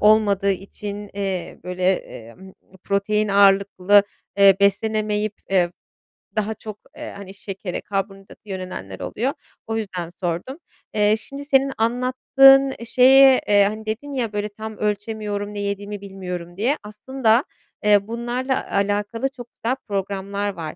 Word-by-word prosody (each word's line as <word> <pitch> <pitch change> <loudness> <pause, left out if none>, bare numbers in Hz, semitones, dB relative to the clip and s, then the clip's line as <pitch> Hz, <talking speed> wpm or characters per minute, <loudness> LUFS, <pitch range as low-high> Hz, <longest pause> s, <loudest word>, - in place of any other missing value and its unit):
olmadığı 205 -2 +4
için, 200 +2 -6
eee, 190 -4 -3
böyle, 180 0 -5 0.2
eee, 115 0 -12
mmm, 190 0 -14 0.3
protein 210 +2 +1
ağırlıklı, 200 0 +5 0.4
eee, 195 -1 +7
beslenemeyip, 210 +1 +1 0.2
eee, 180 -3 +3 0.7
daha 215 0 0
çok, 215 -1 -9 0.2
eee, - - -7
hani, 195 -1 -9
şekere, 195 -2 -6
karbonhidrata 195 0 -5
yönelenler 185 - -6
oluyor. 260 +5 -2 0.3
O 225 0 -2
yüzden 185 -6 -4
sordum. 175 - -4 0.4
Eee, 210 0 +3
şimdi 275 +4 -9
senin 275 -1 +3
anlattığın 260 +3 +5
şeye, 265 +2 +6
eee, 205 -1 +5
hani, 215 +2 -2
dedin 235 +7 -4
ya 235 -5 -2
böyle 205 0 -2
"Tam 220 +1 -8
ölçemiyorum, 210 0 -3
ne 205 - -5
yediğimi 200 0 -4
bilmiyorum" 180 -3 -7
diye, 245 +8 +1
aslında, 230 +3 +1 0.4
eee, 205 -1 +4
bunlarla 240 +3 -2
alakalı 205 +5 0
çok 245 -3 -11
güzel 240 +3 -2
programlar 200 0 -3
var. 165 -4 -6
205 Hz, 135 wpm, -22 LUFS, 195-225 Hz, 0.7 s, eee